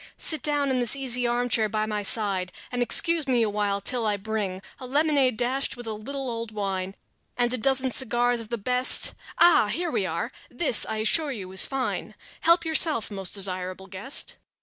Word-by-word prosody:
Sit 315 - +2
down 290 -2 0
in 255 - 0
this 245 +1 +3
easy 250 -3 0
armchair 240 -2 +1
by 215 +1 -1
my 210 -1 -3
side, 195 -3 +1 0.2
And 245 -1 -2
excuse 325 +5 +3
me 245 -3 +2
awhile 205 -2 -1
till 230 +3 0
I 205 -1 0
bring 200 -2 -4 0.2
A 255 - -8
lemonade 280 -3 +2
dashed 260 +3 -1
with 240 - -9
a 220 - -4
little 270 +6 -6
old 230 -2 -5
wine 195 -2 -4 0.4
And 240 0 +1
a - - +1
dozen 265 +2 +1
cigars 245 -1 +2
of 220 - -11
the 235 - -2
best.... 250 +4 +2 0.2
Ah! 345 -11 +5
Here 340 +9 -2
we - - -1
are! - - -3 0.2
This, 310 -10 +2
I 220 - -3
assure 310 +3 +3
you, 195 -7 -7
is 190 - +5
fine; 270 -2 -4 0.2
Help 335 +1 +3
yourself, 315 -8 +2
most 195 -1 -2
desirable 185 -1 -2
guest." 195 +9 -1
240 Hz, 190 wpm, -25 LUFS, 205-265 Hz, 0.4 s, Ah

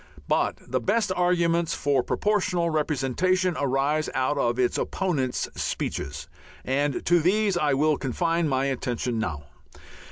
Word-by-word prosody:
But - - +1
the 130 +1 0
best 205 - +1
arguments 170 -2 +1
for 140 -2 +1
Proportional 180 -2 0
Representation 160 +5 +1
arise 140 +3 +1
out 130 +3 +1
of 120 -4 0
its 125 -1 +1
opponents' 145 -10 -1
speeches, 75 +1 -4 0.4
and 140 +1 0
to 175 0 +4
these 200 +4 +2
I 150 -5 +2
will 150 +1 +2
confine 165 +4 0
my 135 0 +1
attention 125 -3 -2
now. 80 -9 -3
150 Hz, 130 wpm, -25 LUFS, 130-175 Hz, 0.4 s, to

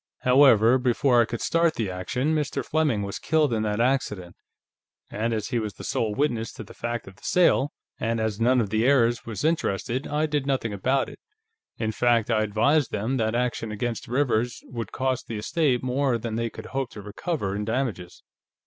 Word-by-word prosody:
However, 125 -2 +6
before 125 0 +3
I - - +3
could 120 +1 -5
start 165 -3 +1
action, 110 +9 -1
Mr. 145 -3 -1
Fleming 145 -10 +1
was 100 0 -5
killed 155 -5 +2
in 110 - 0
that 105 0 -1
accident, 110 -8 0 0.8
and 115 +2 -1
as 110 -1 -2
he 120 -2 0
was 105 -2 -4
the - - -10
sole 110 -2 -1
witness 120 -5 0
to - - -8
the 105 - -13
fact 120 -2 -4
of 95 0 -12
the - - -23
sale, 150 -5 +3 0.3
and 115 0 -1
as 110 -1 -2
none 125 +2 +4
of 105 -4 -1
the 110 +1 +2
heirs 120 -3 +3
was 115 +2 -4
interested, 130 - -1
I 150 +1 0
did 145 -3 -1
nothing 130 -6 0
about 130 +7 +1
it. - - -11 0.6
In 110 -1 -1
fact, 120 0 +2
I 110 -1 +3
advised 115 +7 +2
them 115 +6 -1
that 110 -1 0
action 120 -2 -1
against 115 +2 -3
Rivers 125 -2 0
would 115 -4 -6
cost 130 -1 -2
the 115 - -4
estate 130 +2 0
more 130 0 +1
than 115 0 -5
they 115 +1 -1
could 110 0 -10
hope 135 -2 -1
to 105 - -8
recover 105 - -3
in 105 - -2
damages." 110 -6 -3
120 Hz, 195 wpm, -25 LUFS, 110-135 Hz, 0.8 s, However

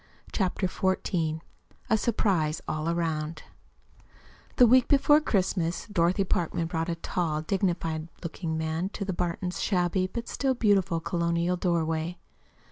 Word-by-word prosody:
CHAPTER 190 -1 0
XIV 175 -4 -1 0.5
A - - +3
SURPRISE 190 -9 +1
ALL 155 +1 -2
AROUND 160 -2 -2 1.1
The 250 - +7
week 250 +1 +5
before 295 +2 +5
Christmas 180 - 0
Dorothy 185 -2 +2
Parkman 170 -2 -1
brought 165 0 -2
a 170 - -1
tall, 165 -2 -2
dignified 170 -3 -1 0.2
looking 165 -1 -3
man 160 +3 -1
to 200 - -4
the 190 - -2
Burtons' 180 +1 -2
shabby, 185 -1 +1
but 235 +5 -6
still 265 -2 0
beautiful, 195 -7 +2
colonial 170 +1 0
doorway. 170 -1 -1
175 Hz, 125 wpm, -28 LUFS, 165-195 Hz, 1.1 s, The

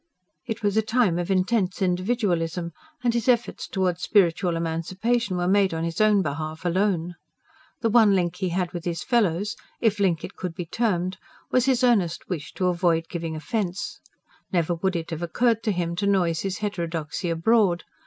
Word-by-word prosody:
It 225 -1 -4
was 205 0 +1
a - - +5
time 220 -6 +1
of 175 - -3
intense 190 0 +1
individualism; 180 -3 0 0.3
and 240 -1 +2
his 235 0 -1
efforts 240 -1 +1
towards 180 -2 -1
spiritual 180 -3 +2
emancipation 185 +6 -1
were 175 0 0
made 195 -2 +3
on 160 - -2
his 165 +3 -2
own 210 -2 +4
behalf 155 +2 -4
alone. 180 -1 +1 0.7
The 230 - +2
one 220 -3 +6
link 175 -1 0
he 185 -1 -1
had 175 0 -1
with 175 -2 -5
his 170 -1 -3
fellows 205 -5 +1 0.2
if 220 -3 +1
link 175 -5 +1
it - - -7
could 180 -3 -5
be 175 - -4
termed 185 -2 -1 0.3
was 255 -1 +3
his 260 -2 +2
earnest 195 -9 +2
wish 160 -6 -4
to 185 - -1
avoid 170 -2 +1
giving 165 -2 -4
offence: 190 +2 -3 0.5
never 175 -1 +1
would 190 +2 -1
it 165 0 -4
have 165 0 -4
occurred 225 +6 +1
to 215 - +2
him 170 -2 -2
to 200 - 0
noise 175 -5 +2
his 195 -1 -2
heterodoxy 170 -5 -3
abroad. 175 +1 +2
185 Hz, 180 wpm, -25 LUFS, 170-210 Hz, 0.7 s, one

